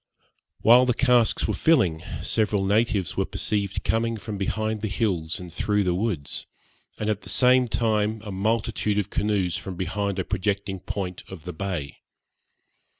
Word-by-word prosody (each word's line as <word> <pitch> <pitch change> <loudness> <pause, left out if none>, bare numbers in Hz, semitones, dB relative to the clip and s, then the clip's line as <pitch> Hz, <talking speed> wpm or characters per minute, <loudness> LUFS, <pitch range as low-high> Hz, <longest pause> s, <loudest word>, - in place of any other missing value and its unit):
While 125 +3 +7
the 125 - +2
casks 125 -3 +3
were - - 0
filling, 105 - +3 0.2
several 105 -3 +1
natives 105 -4 +1
were - - +1
perceived 100 -2 -2
coming 115 0 0
from 105 0 -6
behind 110 +2 -2
the 110 - -1
hills 95 -6 -1
and 90 -2 -9
through 105 +3 +1
the 90 -2 +1
woods, 90 -7 -2 0.5
and 105 - -3
at 105 -1 0
the - - -8
same 125 0 +5
time 110 -1 0
a 105 - -6
multitude 105 +1 0
of 105 - -1
canoes 100 -4 0
from 95 - -6
behind 100 +2 -2
a 95 - -1
projecting 100 0 -2
point 90 -1 -5
of 95 -5 -9
the 90 0 -6
bay. 85 -5 -4
105 Hz, 160 wpm, -25 LUFS, 95-110 Hz, 0.5 s, While